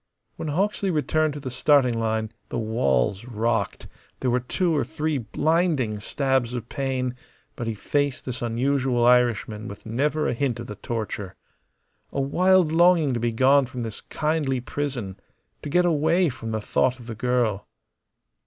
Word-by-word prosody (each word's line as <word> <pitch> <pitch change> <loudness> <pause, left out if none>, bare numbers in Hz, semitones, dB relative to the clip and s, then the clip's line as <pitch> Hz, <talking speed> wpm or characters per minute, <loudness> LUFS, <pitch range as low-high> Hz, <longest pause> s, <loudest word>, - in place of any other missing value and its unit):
When - - -5
Hawksley 195 +5 0
returned 155 -1 +1
to - - -5
the 135 -2 -6
starting 130 -1 +3
line 110 -1 -1 0.2
the - - -3
walls 100 - 0
rocked, 115 -3 -1 0.3
there 125 - 0
were 125 - +2
two 165 +7 0
or 145 - +2
three 150 +3 -2
blinding 140 - 0
stabs 130 +1 0
of 120 -1 -5
pain; 130 -2 -2 0.4
but 120 - -4
he 115 - -2
faced 145 +5 -1
this 125 -1 -5
unusual 125 +1 +1
Irishman 115 -3 +2
with 100 - -10
never 145 +7 0
a - - 0
hint 125 -1 -1
of 120 - -5
the 105 - -6
torture. 105 -5 -4 0.8
A - - -2
wild 180 +4 +3
longing 165 -4 +4
to 120 - -1
be 120 0 0
gone 130 +3 +4
from 125 -1 -5
this 110 -2 -6
kindly 150 -4 -1
prison 125 -7 -4 0.4
to 150 - -6
get 180 +4 +3
away 165 +2 +3
from 120 -3 -6
the 110 -1 -2
thought 130 +4 +1
of 120 - -12
the 115 - -6
girl. 115 -3 0
125 Hz, 165 wpm, -24 LUFS, 115-145 Hz, 0.8 s, longing